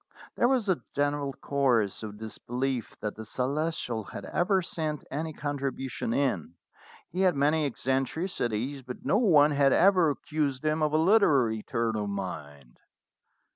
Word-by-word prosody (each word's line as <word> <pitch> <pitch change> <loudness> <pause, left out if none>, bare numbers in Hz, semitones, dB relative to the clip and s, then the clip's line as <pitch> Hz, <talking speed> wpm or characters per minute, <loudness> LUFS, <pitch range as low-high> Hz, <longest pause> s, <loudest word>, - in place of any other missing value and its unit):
There 240 - +3
was 250 -5 +1
a 185 -3 +1
general 145 0 0
chorus 130 -8 0
of 105 -2 -7
disbelief 120 +3 -4
that 105 -1 -2
the 110 - -7
Celestial 125 -1 -2
had - - -8
ever 190 +2 +1
sent 155 -3 -3
any 160 +3 -3
contribution 140 -5 -3
in. 115 - -1 0.6
He 185 - -2
had 185 -4 +4
many 150 +2 +2
eccentricities, 135 - -2
but 125 -1 -9
no 205 - +3
one 155 -10 +5
had 140 -2 +4
ever 185 -3 +5
accused 145 -2 -2
him 155 +1 +1
of 155 -1 +1
a - - +4
literary 150 - +4
turn 115 +1 -1
of 105 -1 -2
mind. 70 -9 -7
140 Hz, 145 wpm, -28 LUFS, 115-155 Hz, 0.6 s, one